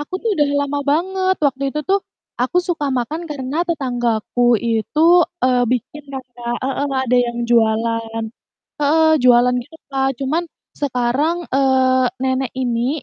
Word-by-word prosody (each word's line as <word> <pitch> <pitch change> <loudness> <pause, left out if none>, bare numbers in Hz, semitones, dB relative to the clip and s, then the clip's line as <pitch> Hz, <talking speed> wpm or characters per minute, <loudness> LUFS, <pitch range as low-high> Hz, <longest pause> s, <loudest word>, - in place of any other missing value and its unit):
aku 295 +5 -7
tuh 455 - 0
udah 290 -1 +3 0.2
lama 285 0 -2
banget 375 +5 +1
waktu 275 -1 0
itu 300 - -2
tuh, 395 +1 +2 0.4
aku 260 +8 +1
suka 320 -6 -2
makan 300 +8 -3
karena 290 +4 -2
tetanggaku 245 -5 +1
itu, 235 +7 +1 0.4
eee, 250 -1 +3
bikin 255 +5 -3
kan 265 -1 -5
Kak 240 0 -3
heeh, 280 +1 -2 0.2
ada 250 0 +2
yang 240 -1 0
jualan 225 0 +1 0.6
heeh, 315 +2 +4
jualan 250 0 +5
gitu 310 +5 -16 0.2
Kak, 270 0 +1
cuman 310 +6 0 0.3
sekarang, 275 +4 0
eee, 260 -1 +3 0.2
nenek 260 -1 -1
ini 250 +3 -1
260 Hz, 145 wpm, -19 LUFS, 240-300 Hz, 0.6 s, jualan